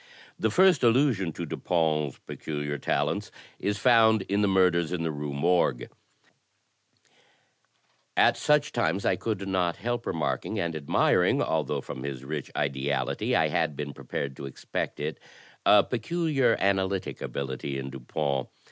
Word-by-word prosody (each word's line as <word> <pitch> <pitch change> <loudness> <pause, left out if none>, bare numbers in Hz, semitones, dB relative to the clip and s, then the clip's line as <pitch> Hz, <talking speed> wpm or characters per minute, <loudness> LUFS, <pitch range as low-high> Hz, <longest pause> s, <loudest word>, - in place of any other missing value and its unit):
The 110 - +2
first 185 - +4
allusion 115 - +3
to 85 - -5
Dupin's 75 -4 0
peculiar 75 -2 -4
talents - - -1 0.3
is 105 +1 -1
found 110 -4 +5
in 100 +2 0
''The 105 - +3
Murders 90 -3 +3
in 90 -2 -2
the 80 - -1
Rue 75 -1 -4
Morgue": 70 -4 +1 2.3
At - - +5
such 150 0 +2
times 90 +4 0
I - - +3
could 100 -4 -3
not 90 -3 0
help 120 0 -3
remarking 80 -3 -2
and 85 -1 -2
admiring 75 -2 +2
(al 80 -1 +1
though - - -2
from 65 - -7
his 65 -1 -5
rich 75 0 -4
ideality 70 0 -1
I - - +3
had 80 -3 0
been 70 0 -5
prepared 70 +1 -5
to 70 - -6
expect 65 - -4
it) - - -4 0.5
a 105 -1 +7
peculiar 135 0 +1
analytic 95 -1 0
ability 70 0 -4
in 70 0 -5
Dupin. 70 +1 -2
85 Hz, 145 wpm, -27 LUFS, 70-105 Hz, 2.3 s, a